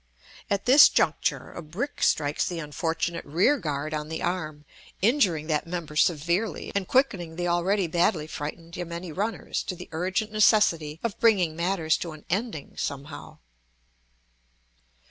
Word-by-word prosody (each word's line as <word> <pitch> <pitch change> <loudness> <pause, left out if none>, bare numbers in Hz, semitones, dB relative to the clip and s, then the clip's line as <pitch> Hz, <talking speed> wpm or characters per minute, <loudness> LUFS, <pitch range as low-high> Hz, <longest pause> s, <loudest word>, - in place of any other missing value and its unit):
At 200 -1 -1
this 275 +4 +9
juncture - - 0
a - - -7
brick 185 - -5
strikes 145 -1 +1
the 175 - -4
unfortunate 165 +2 -2
rear 190 - +2
guard 150 -2 -3
on 150 0 -3
the 160 - -4
arm, 155 -4 -3 0.3
injuring 195 - +2
that 155 0 -1
member 165 -3 -5
severely, 170 +6 +1
and 200 -2 -1
quickening 195 -11 +1
the 175 +1 -2
already 180 +3 +1
badly 170 -1 +1
frightened 165 +2 -7
yameni 170 0 -5
runners 205 +8 -2
to 185 - -5
the 180 +1 -10
urgent 185 +6 -1
necessity 170 -8 +3
of 230 -4 -3
bringing 190 -9 +3
matters 170 -2 +1
to 165 -2 -5
an 155 - -14
ending 195 - -3
somehow. 140 +2 -6
170 Hz, 145 wpm, -26 LUFS, 155-195 Hz, 0.3 s, this